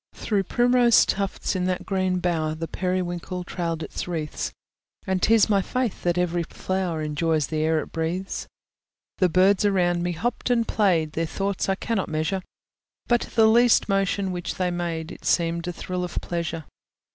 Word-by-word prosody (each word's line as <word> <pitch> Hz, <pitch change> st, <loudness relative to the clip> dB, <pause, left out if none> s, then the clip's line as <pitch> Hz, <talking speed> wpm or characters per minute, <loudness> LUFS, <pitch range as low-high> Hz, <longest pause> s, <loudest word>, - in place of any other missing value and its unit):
Through 200 Hz, -3 st, -1 dB
primrose 245 Hz, +1 st, +4 dB
tufts, 195 Hz, 0 st, -2 dB
in 180 Hz, -1 st, 0 dB
that 185 Hz, 0 st, -1 dB
green 185 Hz, -2 st, 0 dB
bower, 165 Hz, -3 st, 0 dB
The 165 Hz, +1 st, -4 dB
periwinkle 180 Hz, 0 st, -2 dB
trailed 170 Hz, -2 st, -3 dB
its -, -, -5 dB
wreaths; 160 Hz, -4 st, -3 dB, 0.5 s
And 190 Hz, -1 st, 0 dB
'tis 225 Hz, +1 st, +5 dB
my 200 Hz, -2 st, +3 dB
faith 250 Hz, +1 st, -2 dB
that 175 Hz, 0 st, 0 dB
every 175 Hz, -1 st, +1 dB
flower 175 Hz, -1 st, -2 dB
Enjoys 155 Hz, 0 st, 0 dB
the 155 Hz, +3 st, -3 dB
air 160 Hz, 0 st, +2 dB
it -, -, -9 dB
breathes. 170 Hz, +4 st, -3 dB, 0.7 s
The 185 Hz, -, +4 dB
birds 185 Hz, +3 st, +4 dB
around 180 Hz, -4 st, +2 dB
me 175 Hz, 0 st, -1 dB
hopped 235 Hz, +10 st, -2 dB
and 235 Hz, -2 st, +2 dB
played, 175 Hz, -7 st, +2 dB
Their 165 Hz, +1 st, -1 dB
thoughts 195 Hz, +3 st, -2 dB
I 195 Hz, -, +2 dB
cannot 205 Hz, -1 st, -2 dB
measure: 160 Hz, +5 st, -1 dB, 0.6 s
But 240 Hz, -1 st, +1 dB
the 225 Hz, -2 st, +6 dB
least 235 Hz, +2 st, +5 dB
motion 195 Hz, 0 st, +1 dB
which 175 Hz, -1 st, -4 dB
they 180 Hz, -1 st, 0 dB
made 170 Hz, -1 st, -3 dB
It -, -, -11 dB
seemed 170 Hz, 0 st, +1 dB
a -, -, -1 dB
thrill 180 Hz, +1 st, -4 dB
of 180 Hz, -, -5 dB
pleasure. 165 Hz, -2 st, -4 dB
180 Hz, 170 wpm, -24 LUFS, 165-195 Hz, 0.7 s, the